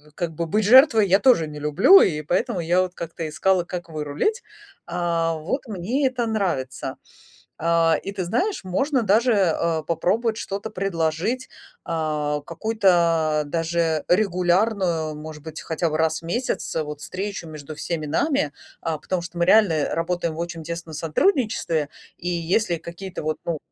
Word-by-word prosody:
как 170 Hz, -2 st, -3 dB
бы 165 Hz, +1 st, -3 dB
быть 210 Hz, +5 st, +1 dB
жертвой 230 Hz, -2 st, +7 dB
я 190 Hz, +2 st, +4 dB
тоже 210 Hz, -10 st, +4 dB
не 150 Hz, 0 st, -8 dB
люблю, 175 Hz, -, +6 dB
и 150 Hz, -4 st, +1 dB
поэтому 190 Hz, -, 0 dB
я 175 Hz, +2 st, +2 dB
вот 185 Hz, -1 st, -2 dB
как-то 165 Hz, -1 st, -5 dB
искала, 185 Hz, +4 st, +2 dB
как 175 Hz, 0 st, -6 dB
вырулить. 155 Hz, -, -2 dB, 0.4 s
А, 170 Hz, -1 st, 0 dB
вот 165 Hz, -, -3 dB
мне 225 Hz, +8 st, 0 dB
это 255 Hz, -2 st, -2 dB
нравится. 180 Hz, -, -2 dB, 0.6 s
А, 165 Hz, -1 st, +3 dB
и 195 Hz, -, -4 dB
ты 190 Hz, -3 st, -3 dB
знаешь, 300 Hz, -, -1 dB
можно 260 Hz, +8 st, 0 dB
даже, 225 Hz, +4 st, +3 dB
э, 170 Hz, -5 st, +1 dB
попробовать 220 Hz, +7 st, 0 dB
что-то 200 Hz, 0 st, -5 dB
предложить. 190 Hz, +5 st, -1 dB, 0.4 s
Э, 150 Hz, -3 st, -1 dB
какую-то 170 Hz, -5 st, +2 dB
даже 165 Hz, 0 st, 0 dB
регулярную, 180 Hz, -3 st, +1 dB
может 150 Hz, 0 st, -9 dB
быть, 160 Hz, 0 st, -8 dB
хотя 165 Hz, +1 st, -2 dB
бы 155 Hz, -, -1 dB
раз 160 Hz, -1 st, +1 dB
в -, -, -18 dB
месяц, 200 Hz, +3 st, -2 dB
э, 160 Hz, -, +1 dB
вот, 150 Hz, -1 st, -7 dB
встречу 185 Hz, +2 st, -5 dB
между 155 Hz, 0 st, -8 dB
всеми 155 Hz, 0 st, -4 dB
нами. 160 Hz, -, 0 dB, 0.3 s
А, 160 Hz, -1 st, -2 dB
потому 185 Hz, +3 st, -2 dB
что 175 Hz, 0 st, -9 dB
мы 170 Hz, -, +3 dB
реально 175 Hz, -6 st, +4 dB
работаем 165 Hz, -1 st, -1 dB
в -, -, -9 dB
очень 170 Hz, -1 st, -4 dB
тесно 170 Hz, 0 st, -6 dB
сотрудничестве, 165 Hz, -, 0 dB, 0.3 s
и 175 Hz, -, -5 dB
если 175 Hz, +2 st, 0 dB
какие-то, 170 Hz, +2 st, -7 dB
вот, 155 Hz, 0 st, -2 dB
ну, 165 Hz, -2 st, -2 dB
170 Hz, 160 wpm, -23 LUFS, 160-200 Hz, 0.6 s, жертвой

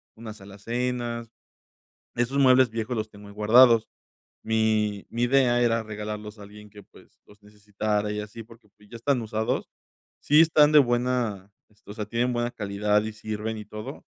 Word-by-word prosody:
unas 110 Hz, -2 st, -10 dB
alacenas. 115 Hz, +3 st, -4 dB, 0.9 s
Esos 120 Hz, +4 st, -1 dB
muebles 130 Hz, -2 st, +5 dB
viejos 115 Hz, +2 st, -4 dB
los 110 Hz, 0 st, -4 dB
tengo 100 Hz, 0 st, -14 dB
ahí 100 Hz, -, -13 dB
guardados. 115 Hz, +2 st, +5 dB, 0.6 s
Mi 110 Hz, -2 st, 0 dB
mi 120 Hz, +1 st, -1 dB
idea 120 Hz, -1 st, +3 dB
era 115 Hz, -1 st, +1 dB
regalarlos 105 Hz, 0 st, -7 dB
a 100 Hz, -, -10 dB
alguien 105 Hz, +1 st, -14 dB
que, 105 Hz, -1 st, -14 dB
pues, -, -, -22 dB
los 105 Hz, 0 st, -21 dB
necesitara 105 Hz, 0 st, -3 dB
y 105 Hz, -, -3 dB
así, 105 Hz, +2 st, -9 dB
porque, 115 Hz, -1 st, -19 dB
pues, 105 Hz, 0 st, -21 dB
ya 120 Hz, -, -8 dB
están 130 Hz, +1 st, 0 dB
usados. 110 Hz, 0 st, -2 dB, 0.5 s
Sí 150 Hz, +2 st, +5 dB
están 155 Hz, -2 st, +4 dB
de 150 Hz, -, +8 dB
buena, 120 Hz, -5 st, -1 dB, 0.2 s
este, 105 Hz, -1 st, -19 dB
o -, -, -7 dB
sea, 105 Hz, -2 st, -5 dB
tienen 120 Hz, +3 st, -1 dB
buena 120 Hz, 0 st, -1 dB
calidad 105 Hz, 0 st, 0 dB
y 110 Hz, -, -5 dB
sirven 110 Hz, +1 st, -5 dB
y 105 Hz, -, -8 dB
todo, 105 Hz, 0 st, -9 dB
110 Hz, 175 wpm, -25 LUFS, 105-120 Hz, 0.9 s, de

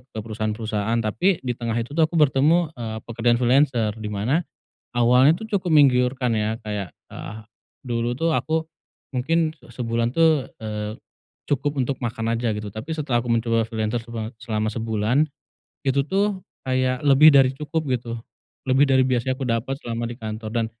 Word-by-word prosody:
ke 110 Hz, -, -9 dB
perusahaan-perusahaan, 110 Hz, 0 st, -2 dB
tapi 175 Hz, -, +2 dB
di 125 Hz, -, 0 dB
tengah 115 Hz, -1 st, -3 dB
itu 120 Hz, +3 st, -3 dB
tuh -, -, +2 dB
aku 170 Hz, -, -5 dB
bertemu, 155 Hz, +3 st, +3 dB
eee, 110 Hz, -2 st, -5 dB
pekerjaan 120 Hz, 0 st, +1 dB
freelancer 125 Hz, -3 st, +3 dB
dimana, 105 Hz, -, 0 dB, 0.5 s
awalnya 125 Hz, +4 st, +5 dB
tuh 220 Hz, -, -7 dB
cukup 180 Hz, -2 st, -3 dB
menggiurkan 125 Hz, -3 st, +4 dB
ya 110 Hz, +1 st, -1 dB
kayak, 105 Hz, -5 st, -5 dB, 0.2 s
eh 105 Hz, -, -7 dB, 0.5 s
dulu 120 Hz, -1 st, -1 dB
tuh 165 Hz, +3 st, +1 dB
aku 160 Hz, +2 st, -1 dB, 0.5 s
mungkin 160 Hz, +4 st, +1 dB
sebulan 115 Hz, -1 st, -2 dB
tuh, 160 Hz, -4 st, +3 dB, 0.2 s
eee, 105 Hz, 0 st, -4 dB, 0.6 s
cukup 145 Hz, +1 st, 0 dB
untuk 130 Hz, +1 st, -2 dB
makan 115 Hz, -1 st, -1 dB
aja 115 Hz, -1 st, 0 dB
gitu 105 Hz, 0 st, -5 dB
tapi 110 Hz, +9 st, -6 dB
setelah 145 Hz, -6 st, -1 dB
aku 120 Hz, -, -6 dB
mencoba 115 Hz, 0 st, +1 dB
freelancer 110 Hz, +1 st, -2 dB
sebat 115 Hz, -2 st, -5 dB
selama 110 Hz, -2 st, -1 dB
sebulan, 115 Hz, +5 st, +1 dB, 0.6 s
itu 140 Hz, +1 st, +3 dB
tuh 200 Hz, +1 st, +1 dB, 0.3 s
kayak 130 Hz, -1 st, 0 dB
lebih 145 Hz, +3 st, +8 dB
dari 135 Hz, -2 st, +6 dB
cukup 155 Hz, +2 st, -3 dB
gitu, 120 Hz, -2 st, -2 dB, 0.5 s
lebih 135 Hz, +2 st, +5 dB
dari 130 Hz, -1 st, +5 dB
biasanya 130 Hz, +1 st, 0 dB
aku 135 Hz, -, -3 dB
dapat 115 Hz, +3 st, -1 dB
selama 115 Hz, 0 st, -3 dB
di 120 Hz, -, -6 dB
kantor 110 Hz, 0 st, -5 dB
dan 115 Hz, -2 st, +1 dB
120 Hz, 160 wpm, -23 LUFS, 110-140 Hz, 0.6 s, lebih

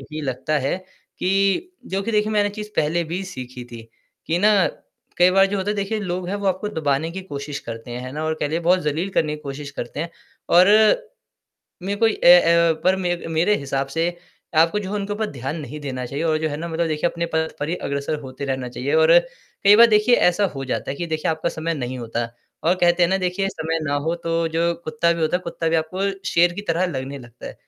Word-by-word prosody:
यही 150 Hz, +3 st, -7 dB
लगता 145 Hz, +3 st, -1 dB
है 135 Hz, +5 st, -1 dB, 0.4 s
कि 195 Hz, -, +1 dB, 0.2 s
जो 195 Hz, +1 st, -2 dB
कि 230 Hz, -, -3 dB
देखिए 210 Hz, 0 st, +1 dB
मैंने 205 Hz, -1 st, +2 dB
एक 205 Hz, -, -10 dB
चीज़ 210 Hz, 0 st, -6 dB
पहले 165 Hz, +3 st, +1 dB
भी 175 Hz, +4 st, -4 dB
सीखी 125 Hz, -1 st, -8 dB
थी, 120 Hz, -1 st, -10 dB, 0.4 s
कि 165 Hz, -, +1 dB
ना 210 Hz, +3 st, +5 dB, 0.6 s
कई 180 Hz, +1 st, +6 dB
बार 195 Hz, +1 st, +5 dB
जो 200 Hz, +1 st, -2 dB
होता 195 Hz, +1 st, -1 dB
है 210 Hz, -, 0 dB
देखिए 200 Hz, +2 st, -1 dB
लोग 180 Hz, -2 st, -3 dB
है 200 Hz, -, -2 dB
वो 200 Hz, -1 st, -4 dB
आपको 190 Hz, +2 st, 0 dB
दबाने 155 Hz, -3 st, -1 dB
की 190 Hz, +3 st, -6 dB
कोशिश 145 Hz, -4 st, -6 dB
करते 115 Hz, -1 st, -8 dB
हैं, 120 Hz, -, -5 dB
है 130 Hz, -, -7 dB
ना 155 Hz, +1 st, -4 dB
और 160 Hz, 0 st, 0 dB
कह -, -, 0 dB
लें 165 Hz, +3 st, -2 dB
बहुत 180 Hz, +2 st, +3 dB
ज़लील 160 Hz, +5 st, -2 dB
करने 155 Hz, -4 st, 0 dB
की 150 Hz, -, -16 dB
कोशिश 140 Hz, 0 st, -6 dB
करते 135 Hz, 0 st, -6 dB
हैं 165 Hz, +1 st, -4 dB, 0.4 s
और 180 Hz, +2 st, +6 dB, 1.2 s
मेरे 195 Hz, +2 st, -2 dB
को 225 Hz, -, +5 dB
ए 180 Hz, -5 st, +7 dB
अ, 170 Hz, 0 st, +4 dB
पर 185 Hz, +1 st, +4 dB
मे 180 Hz, -2 st, -1 dB
मेरे 165 Hz, +6 st, +2 dB
हिसाब 135 Hz, -1 st, -2 dB
से 165 Hz, +4 st, 0 dB, 0.5 s
आपको 165 Hz, +5 st, +3 dB
जो 195 Hz, -2 st, -5 dB
है 205 Hz, -, -3 dB
उनके 205 Hz, 0 st, -2 dB
ऊपर 215 Hz, +1 st, -1 dB
ध्यान 135 Hz, +3 st, -4 dB
नहीं 150 Hz, +2 st, -7 dB
देना 130 Hz, -3 st, -4 dB
चाहिए 140 Hz, +5 st, -4 dB
और 155 Hz, -1 st, +2 dB
जो 155 Hz, 0 st, -1 dB
है 145 Hz, -, -3 dB
ना 170 Hz, +2 st, -4 dB
मतलब 165 Hz, 0 st, -1 dB
देखिए 155 Hz, +2 st, 0 dB
अपने 170 Hz, 0 st, -3 dB
पद 160 Hz, 0 st, 0 dB
पर 145 Hz, -, -2 dB
ही 175 Hz, -, 0 dB
अग्रसर 140 Hz, +2 st, -2 dB
होते 135 Hz, 0 st, -7 dB
रहना 130 Hz, -2 st, -3 dB
चाहिए 125 Hz, -, -3 dB
और 485 Hz, +1 st, +5 dB
कई 485 Hz, -, +1 dB
बार 235 Hz, +2 st, +8 dB
देखिए 215 Hz, +3 st, +4 dB
ऐसा 190 Hz, +3 st, +2 dB
हो 135 Hz, -, -4 dB
जाता 130 Hz, -, -2 dB
है -, -, -5 dB
कि 175 Hz, -, -3 dB
देखिए 155 Hz, -1 st, -1 dB
आपका 160 Hz, +2 st, -1 dB
समय 165 Hz, +1 st, -3 dB
नहीं 130 Hz, -4 st, -4 dB
होता। 115 Hz, 0 st, -3 dB, 0.4 s
और 175 Hz, +3 st, +3 dB
कहते 175 Hz, -1 st, +3 dB
है 175 Hz, -, +3 dB
ना 190 Hz, -, +2 dB
देखिए 185 Hz, +1 st, -1 dB
समय 165 Hz, -2 st, -2 dB
ना 145 Hz, -1 st, -1 dB
हो 165 Hz, +1 st, 0 dB
तो 165 Hz, 0 st, 0 dB
जो 170 Hz, +1 st, +2 dB
कुत्ता 155 Hz, +2 st, +1 dB
भी 170 Hz, -, -4 dB
होता 160 Hz, +3 st, +2 dB
है -, -, -11 dB
कुत्ता 170 Hz, -1 st, -3 dB
भी 165 Hz, -, +2 dB
आपको 160 Hz, +4 st, -2 dB, 0.3 s
शेर 170 Hz, +1 st, +4 dB
की 205 Hz, -, -5 dB
तरह 170 Hz, +3 st, +2 dB
लगने 135 Hz, -3 st, -5 dB
लगता 120 Hz, -1 st, -13 dB
है। -, -, -8 dB
165 Hz, 245 wpm, -22 LUFS, 145-190 Hz, 1.2 s, बार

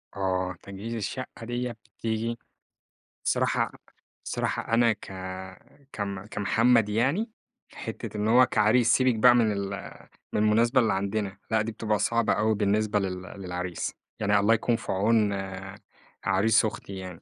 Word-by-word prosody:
آه، 95 Hz, -1 st, -1 dB
تجهيز 100 Hz, +4 st, -6 dB
الشقة 115 Hz, +2 st, -5 dB
ديّة 120 Hz, +1 st, -2 dB, 0.3 s
بتيجي 115 Hz, +1 st, -2 dB, 0.9 s
صراحة -, -, +1 dB, 0.5 s
صراحة -, -, -2 dB
أنا 115 Hz, 0 st, +5 dB
ك 105 Hz, -, -12 dB, 0.8 s
كم 100 Hz, -2 st, -4 dB
كمحمد 115 Hz, +2 st, +2 dB
يعني 135 Hz, -, +1 dB, 0.4 s
حتّة -, -, -6 dB
إن 105 Hz, +1 st, 0 dB
هو 125 Hz, +3 st, +7 dB
كعريس 115 Hz, +2 st, +3 dB
سيبِك 130 Hz, -2 st, +3 dB
بقى 120 Hz, +3 st, +6 dB
من 115 Hz, -3 st, +3 dB
ال 100 Hz, -1 st, -2 dB, 0.6 s
من -, -, +1 dB
المناسبة 115 Hz, +4 st, +4 dB
اللي 110 Hz, -, +2 dB
عندنا، 100 Hz, 0 st, -2 dB
لا 110 Hz, -1 st, +3 dB
دي 110 Hz, +2 st, -3 dB
بتبقى 110 Hz, -1 st, -1 dB
صعبة 115 Hz, +2 st, +2 dB
أوي 110 Hz, +1 st, +2 dB
بالنسبة 105 Hz, +1 st, +1 dB
لل 95 Hz, -2 st, -3 dB
للعريس، 90 Hz, -2 st, -5 dB, 0.3 s
يعني 105 Hz, -1 st, +3 dB
الله 105 Hz, +3 st, +4 dB
يكون 115 Hz, +1 st, +1 dB
في 115 Hz, -, -5 dB
عون 105 Hz, +1 st, +2 dB, 0.9 s
عريس 105 Hz, +3 st, +3 dB
أختي 105 Hz, -2 st, -5 dB
يعني، 90 Hz, -3 st, -8 dB
110 Hz, 140 wpm, -27 LUFS, 100-115 Hz, 0.9 s, هو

